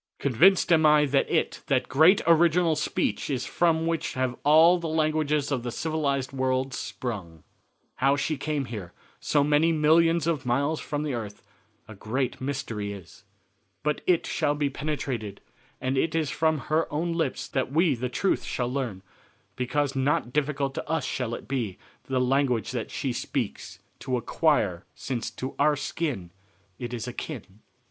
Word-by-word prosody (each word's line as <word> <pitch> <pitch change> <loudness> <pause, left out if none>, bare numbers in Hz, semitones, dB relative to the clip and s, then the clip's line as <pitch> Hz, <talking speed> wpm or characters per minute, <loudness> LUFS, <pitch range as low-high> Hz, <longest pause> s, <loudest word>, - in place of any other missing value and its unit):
Convinced 170 - +4
am 160 -1 +4
I 150 -1 +6
that 140 0 +1
it 165 - 0
that 135 -4 +1
great 160 +9 +5
original 170 0 +4
speech 150 - -1
is 130 -3 -1
from 165 -2 +1
which 165 -1 -2
have 130 -1 -1
all 160 +4 +6
the 170 - -4
languages 155 -2 +1
of 130 -3 0
the 120 - -4
civilized 140 -3 -1
world 130 0 0
sprung." 95 - -5 0.5
"How 135 +2 +3
she 145 +2 -1
here 150 -1 -2
came, 105 -7 -6 0.3
so 145 -2 +2
many 150 +3 +3
millions 165 +2 +4
of 165 -5 0
miles 140 +6 0
from 145 0 -3
the 150 -3 -2
earth, 105 -4 -6 0.4
a 110 - -9
great 125 +6 -3
mystery 115 -7 -3
is. 100 0 -12 0.6
But 150 0 0
it 175 -2 +3
shall 145 - 0
be 145 -1 0
penetrated, 130 -8 -4 0.4
and 130 +1 -1
it 160 +2 0
is 155 -4 0
from 160 -2 +1
her 160 +1 +1
own 165 +3 -1
lips 160 -5 -2
that 130 -1 -1
we 160 +1 +3
the 125 0 -3
truth 195 +9 0
shall 125 0 -2
learn, 120 -9 -3 0.5
because 135 +2 -1
not 135 -2 0
difficult 140 -2 0
to - - -6
us 160 -4 0
shall 120 -3 -2
it - - -10
be 120 -8 -2 0.3
the 130 -1 0
language 125 -3 +1
that - - -4
she - - -2
speaks - - -4 0.2
to 130 -1 -1
acquire 115 - +1
since 125 -4 -3
to 130 - -6
our 150 -1 +3 0.2
own 115 - -2 0.5
it 120 -1 -5
is 120 -1 -4
akin." 120 -5 -7
140 Hz, 165 wpm, -26 LUFS, 125-155 Hz, 0.6 s, I